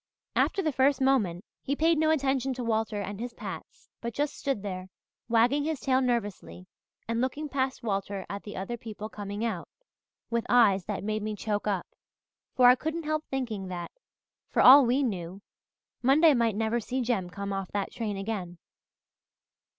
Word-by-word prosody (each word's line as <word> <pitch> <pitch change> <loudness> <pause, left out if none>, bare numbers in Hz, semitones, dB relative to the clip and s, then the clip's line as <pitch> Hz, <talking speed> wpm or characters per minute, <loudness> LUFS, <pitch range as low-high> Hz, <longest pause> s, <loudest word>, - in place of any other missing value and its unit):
After 390 - +2
the 310 - +1
first 265 0 +3
moment, 225 -9 +1 0.2
he 280 - -1
paid 325 +1 +3
no 315 0 +3
attention 270 -3 +1
to 250 - -4
Walter 220 -2 0
and 205 +1 -6
his 240 +1 -5
pats, - - -8
but 235 0 -5
just 290 0 -1
stood 270 -8 -2
there, 185 -2 -5 0.4
wagging 240 +5 +3
his 310 -2 -2
tail 260 0 +2
nervously 225 -7 -2 0.4
and 230 +1 0
looking 285 +4 -2
past 265 -2 -2
Walter 195 -2 -2
at 200 0 -5
the 210 - -8
other 235 +6 -4
people 215 -2 -7
coming 205 +1 -4
out, 190 -7 -3 0.6
with 235 -1 +1
eyes 205 -6 +5
that 210 -2 -4
made 215 +1 -1
me 215 0 -3
choke 210 0 -2
up, 195 -4 0 0.7
for 250 - +5
I 245 - +10
couldn't 315 +5 -3
help 310 0 -1
thinking 230 -8 -3
that, 175 -2 -5 0.6
for - - +2
all 270 0 +10
we 260 +4 +2
knew, 190 -4 -4 0.6
Monday 295 +5 +6
might 230 -4 +2
never 225 +2 0
see 255 +3 -3
Jem 225 -7 -1
come 200 +2 -5
off 195 -1 -4
that 200 -1 -2
train 210 -4 -3
again. 195 -4 -4
230 Hz, 175 wpm, -28 LUFS, 200-265 Hz, 0.7 s, I